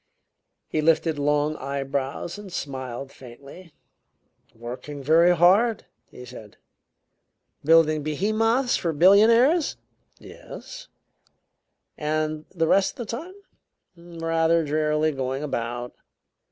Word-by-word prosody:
He 155 - -1
lifted 160 -1 +1
long 150 +1 +1
eyebrows 140 +5 -4
and 200 -2 -11
smiled 135 -3 -6
faintly. 140 +8 -14 0.8
"Working 125 +5 -8
very 165 +5 +4
hard," 200 +7 +3 0.2
he 125 - -12
said. 115 -4 -12 1.1
"Building 155 0 +4
behemoths 220 - 0
for 165 -2 -2
billionaires?" 230 - +4 0.4
"Yes." - - -11 1.1
"And 155 0 -2
the 165 -3 -1
rest 195 +7 +2
of 240 - -4
the - - -6
time?" 345 +9 -9 0.6
"Rather 165 -1 0
drearily 150 +1 0
going 135 0 -4
about." 120 -3 -4
155 Hz, 100 wpm, -24 LUFS, 140-180 Hz, 1.1 s, very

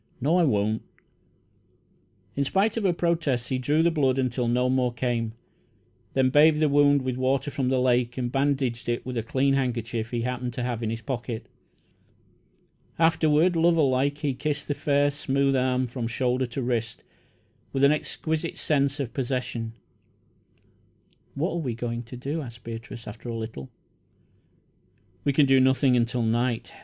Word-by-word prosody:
"No, 150 +7 +2
I 180 - +4
won't." 110 -3 +1 1.5
In 140 - +1
spite 195 +9 +1
of 225 -3 -1
her 185 - +4
protests, 165 -8 0
he 130 - 0
drew 150 +5 +2
the 170 - +3
blood 135 -5 +1
until 125 -2 0
no 125 +2 +2
more 125 -1 +1
came, 120 -2 -2 0.8
then 130 -1 +3
bathed 150 +2 +5
the 155 -1 +3
wound 145 -1 +4
with 130 -1 -2
water 135 +3 0
from 130 -2 -1
the 130 -1 +2
lake, 125 -1 +1
and 120 -2 -2
bandaged 135 -4 0
it 120 - -2
with 125 0 -5
a 115 - 0
clean 135 +5 +1
handkerchief 115 -4 -1
he 120 -1 -2
happened 125 0 -3
to 125 - -3
have 120 -2 -2
in 110 - -1
his 115 +1 -4
pocket. 120 -2 -4 1.5
Afterward, 165 +1 +3
lover 165 -1 +4
like, 135 +2 +1
he 145 -2 -1
kissed 145 +2 -3
the 145 - 0
fair, 145 0 +1
smooth 140 -1 0
arm 130 0 +1
from 120 -1 -4
shoulder 125 +2 0
to 125 +2 -4
wrist, 120 -2 -2 0.7
with 135 - 0
an 140 - +7
exquisite 160 +2 -2
sense 140 -2 +1
of 125 -5 -3
possession. 125 -3 -3 1.6
"What 155 +6 -1
are 170 - -2
we 130 -9 -2
going 115 0 -3
to 125 +2 -9
do?" 140 +6 -3
asked 120 -4 -10
Beatrice, 115 0 -8
after 115 +3 -8
a 115 - -3
little. 110 - -6 1.6
"We 140 - +3
can 140 +1 +4
do 135 -1 +5
nothing 130 0 +4
until 120 0 +1
night. 120 +1 -1
130 Hz, 170 wpm, -26 LUFS, 120-145 Hz, 1.6 s, an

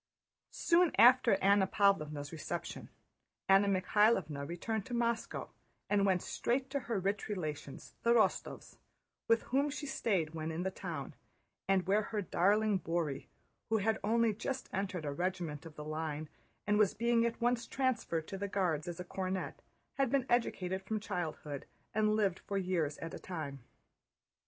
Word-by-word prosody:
Soon 345 0 +3
after 240 0 +7
Anna 200 0 +5
Pávlovna's 155 -9 +1
reception 170 +1 -5 0.6
Anna 195 +1 +6
Mikháylovna 190 -6 +2
returned 205 +6 -3
to 245 - -3
Moscow 235 -1 -1 0.4
and 200 -1 +4
went 185 -2 +2
straight 260 +2 -1
to 280 - 0
her 230 -5 -2
rich 200 +2 -1
relations, 155 -8 -5
the 235 - +1
Rostóvs, 235 -2 +1 0.5
with 230 0 +4
whom 275 +3 +1
she 290 +1 -5
stayed 195 - 0
when 160 0 -3
in 165 +2 -3
the 190 - -1
town - - -6 0.5
and 190 -2 +3
where 200 +3 +3
her 215 0 -3
darling 205 +3 +2
Bóry, 165 -5 -2 0.4
who 220 - +3
had 220 +2 +1
only 230 +1 +3
just 260 +5 -4
entered 185 -4 -2
a 145 - -1
regiment 170 -1 -3
of 155 - -13
the 150 - -7
line 155 -1 -3 0.4
and 210 0 +2
was 210 -3 +4
being 235 +1 +3
at 235 0 -1
once 240 0 +1
transferred 225 -12 -1
to 195 - -5
the 200 - -2
Guards 180 -6 0
as 175 -1 -5
a - - -3
cornet, 185 - -4 0.4
had 270 -2 +3
been 270 -1 +1
educated 190 -6 0
from 215 +3 -2
childhood 160 -8 -4 0.3
and 215 0 +2
lived 200 -4 +1
for 200 - -4
years 175 -6 0
at 165 - -6
a - - -6
time. 155 -6 -5
195 Hz, 160 wpm, -34 LUFS, 170-225 Hz, 0.6 s, after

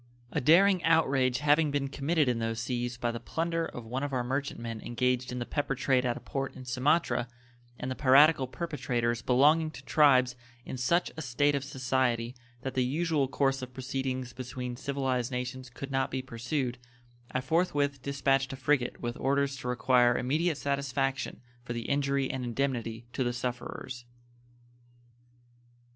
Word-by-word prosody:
A - - -1
daring 180 +6 +5
outrage 135 -6 +3
having 150 +1 +4
been 140 -1 -1
committed 145 +2 +1
in 120 -2 +1
those 115 0 -2
seas 120 0 -2
by 120 -1 -1
the 115 - -5
plunder 165 +6 -1
of 120 - -8
one 125 +4 -3
of 145 -1 -3
our 125 -1 0
merchant 135 +3 -2
men 115 -1 -5
engaged 125 +1 0
in 125 - -4
the 120 - -3
pepper 145 0 -1
trade 130 -1 +2
at 120 - -1
a - - -6
port 135 0 -4
in 130 - -9
Sumatra, 130 +1 +1 0.5
and 125 - -3
the - - -2
piratical 140 +1 +5
perpetrators 125 -7 -2
belonging 150 +5 +4
to 135 -3 -11
tribes 130 -5 +4 0.3
in - - -5
such 130 +8 +1
a 160 - -5
state 145 +2 +1
of 140 -1 -1
society 130 -3 0 0.3
that 135 - -3
the 130 - +2
usual 150 +1 +1
course 135 0 +1
of 130 -1 -8
proceedings 130 -1 -3
between 125 0 -5
civilized 130 -2 -1
nations 125 +1 -4
could 135 +3 -8
not 135 0 +1
be 130 0 -3
pursued, 125 +1 -3 0.5
I 130 - 0
forthwith 145 -2 0
dispatched 135 -1 +1
a - - -4
frigate 130 -1 0
with 120 0 -3
orders 140 +1 +1
to 125 - -6
require 125 -1 +3
immediate 155 +5 0
satisfaction 140 -1 -1 0.2
for 120 - -5
the 120 -1 -4
injury 140 -1 +1
and 130 -1 -4
indemnity 120 -2 -2
to 130 - 0
the 120 0 -1
sufferers. 125 0 -5
130 Hz, 170 wpm, -29 LUFS, 125-140 Hz, 0.5 s, daring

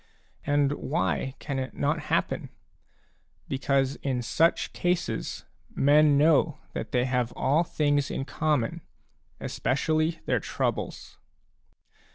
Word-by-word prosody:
And 145 -1 +3
why 145 -2 -1
can 140 -3 -4
it 130 - -5
not - - 0
happen? - - 0 1.0
Because 135 0 0
in 130 -3 -2
such 160 +9 +2
cases 175 0 -2 0.3
men 145 +1 +5
know 155 0 +4 0.2
that - - -5
they 125 0 +2
have 125 -2 0
all 145 +6 +2
things 145 -4 +1
in 135 - -3
common, 150 -6 0 0.6
especially 155 +4 0
their - - +1
troubles. - - -3
145 Hz, 110 wpm, -27 LUFS, 130-155 Hz, 1.0 s, men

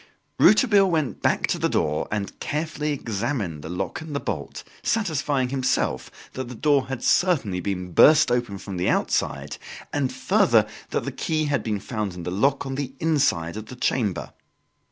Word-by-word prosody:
Rouletabille 205 -4 +5
went 155 -6 -1
back - - +2
to - - -1
the - - +1
door 75 -2 0
and 105 -1 -3
carefully 150 0 -2
examined 115 - -3
the 80 - -8
lock 90 - -4
and 160 -2 -7
the - - 0
bolt, - - -5 0.2
satisfying 145 - 0
himself 130 -1 0 0.2
that 130 -1 -5
the 125 - -8
door 140 +1 +2
had 135 -2 -5
certainly 135 - +2
been 90 -1 -3
burst 155 - +6
open 120 -5 0
from 95 -1 -7
the 90 - +1
outside, - - -1 0.4
and, 140 -3 0
further, 130 - +3 0.2
that - - -2
the 140 - -3
key 155 +4 -1
had 145 -1 0
been 105 -2 -2
found 105 -3 -4
in 90 - -7
the 90 - -3
lock 135 +9 +1
on 135 - -4
the 135 -1 -4
inside 130 - +1
of 110 0 -7
the 125 - -9
chamber. 105 -8 -1
130 Hz, 175 wpm, -24 LUFS, 100-150 Hz, 0.4 s, burst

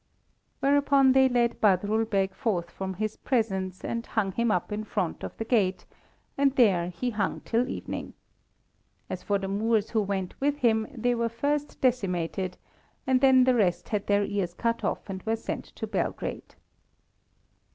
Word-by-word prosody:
Whereupon 280 -1 +4
they 265 0 +5
led 240 -1 +1
Badrul 210 +2 +2
Beg 195 -2 +1
forth 175 -7 -2
from 190 -1 -5
his 215 +3 -3
presence, 190 -7 -1
and 230 0 -2
hung 215 -5 -1
him 235 +4 0
up 180 -1 0
in 210 +1 -2
front 195 -5 -2
of - - -6
the 225 - -3
gate, 205 -6 +1 0.5
and 280 -1 +3
there 190 -9 +4
he 245 +7 -3
hung 210 -2 -2
till 240 +2 0
evening. - - -5 1.0
As - - -4
for 205 - 0
the 195 -1 -4
Moors 215 +2 0
who 220 - +2
were 195 -2 -2
with 290 +1 +1
him, 220 -5 +2
they 245 -2 0
were 235 -1 0
first 285 +5 -2
decimated, 185 -7 0 0.5
and 260 -1 +2
then 260 -2 +6
the 255 0 +4
rest 190 -7 +1
had 210 -2 -2
their 205 0 +3
ears 190 -4 -2
cut 230 +3 -1
off - - -2
and 190 -1 -5
were 225 +3 0
sent 225 - -5
to - - -7
Belgrade. - - -3
220 Hz, 170 wpm, -27 LUFS, 195-245 Hz, 1.0 s, then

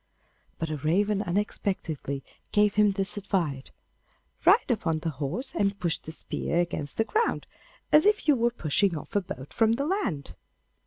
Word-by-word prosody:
But 165 -1 -3
a 155 - -2
raven 195 +8 +1
unexpectedly 175 -7 -2 0.3
gave 210 -1 +4
him 210 -1 +4
this 195 +1 -1
advice: 170 -9 -1 0.8
'Ride 375 - +5
upon 165 -8 0
the 160 +1 -3
horse, 155 - -3
and 200 0 0
push 170 -1 0
the 160 - -8
spear 160 - -3
against 170 -5 -1
the 225 - +3
ground, 455 - 0 0.5
as 305 +6 +6
if 420 -5 +2
you 295 - +6
were 235 -1 +2
pushing 185 -4 +1
off 180 - -10
a 205 - +4
boat 130 -6 -8
from 225 0 +3
the 275 +4 -1
land. 245 - -2
195 Hz, 165 wpm, -27 LUFS, 160-220 Hz, 0.8 s, as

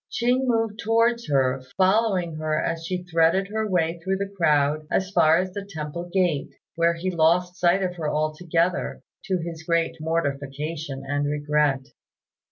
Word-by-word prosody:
Ching 250 +2 +1
moved 225 -3 0
towards 230 +2 +2
her, 135 -2 +2 0.2
following 190 -4 +2
her 155 0 -1
as 165 0 -2
she 180 0 -3
threaded 175 +3 +2
her 220 0 -2
way 170 -2 0
through 190 +3 -1
the 200 0 -4
crowd 150 -3 +2
as 190 +1 0
far 165 -4 +5
as 185 +1 -2
the 200 0 -5
temple 170 -2 -6
gate, 175 -7 +1 0.2
where 170 0 +2
he 185 +3 -2
lost 175 +2 +2
sight 180 +2 +3
of 180 -1 -3
her 155 -3 -2
altogether, 165 +3 -1 0.2
to 185 - 0
his 165 -1 -6
great 165 0 0
mortification 145 -2 -3
and 145 +1 0
regret. 145 -2 +1
170 Hz, 160 wpm, -24 LUFS, 155-190 Hz, 0.2 s, far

